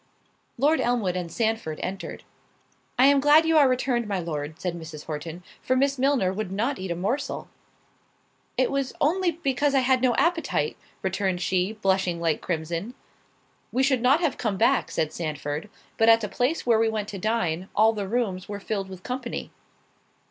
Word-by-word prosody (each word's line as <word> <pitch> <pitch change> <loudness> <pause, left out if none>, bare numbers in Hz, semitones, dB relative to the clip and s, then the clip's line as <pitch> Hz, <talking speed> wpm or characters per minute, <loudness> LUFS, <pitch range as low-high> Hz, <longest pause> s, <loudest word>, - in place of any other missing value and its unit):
Lord 295 +6 +3
Elmwood 230 -7 0
and 175 -2 -4
Sandford 220 -8 -1
entered. 190 +1 -5 0.7
"I 255 - +6
am 280 0 +6
glad 295 +3 +6
you 325 0 +3
are 280 -3 +6
returned, 250 -2 0
my 200 -2 -1
Lord," 155 -2 -4
said 180 -2 -2
Mrs. 160 -3 -8
Horton, 160 +3 -6 0.2
"for 255 - +1
Miss 275 +1 +1
Milner 260 -9 +2
would 205 -1 -4
not 235 +8 -1
eat 190 0 -5
a 170 - -1
morsel." 215 +11 -2 1.1
"It 255 - +2
was 275 -1 -1
only 355 +5 +2
because 280 -3 0
I 270 - +5
had 255 0 +3
no 250 -2 +3
appetite," 335 -1 +1 0.3
returned 190 -1 0
she, 185 +3 0
blushing 190 -4 0
like 165 -2 0
crimson. 170 +7 -3 0.8
"We 260 - +1
should 265 -3 +2
not 270 +7 +4
have 325 -5 0
come 215 -5 -1
back," 250 +5 +3
said 155 -1 -1
Sandford, 150 +2 -4 0.3
"but 225 0 +5
at 225 0 +6
the 210 - -2
place 255 +10 0
where 230 -2 +4
we 225 0 +3
went 215 -2 -2
to 200 - -6
dine, 190 -4 -1
all 220 +1 +5
the 205 -3 -3
rooms 200 -5 -2
were 205 -1 -4
filled 195 -1 -3
with 185 -1 -10
company." 250 -1 -4
220 Hz, 180 wpm, -25 LUFS, 180-260 Hz, 1.1 s, I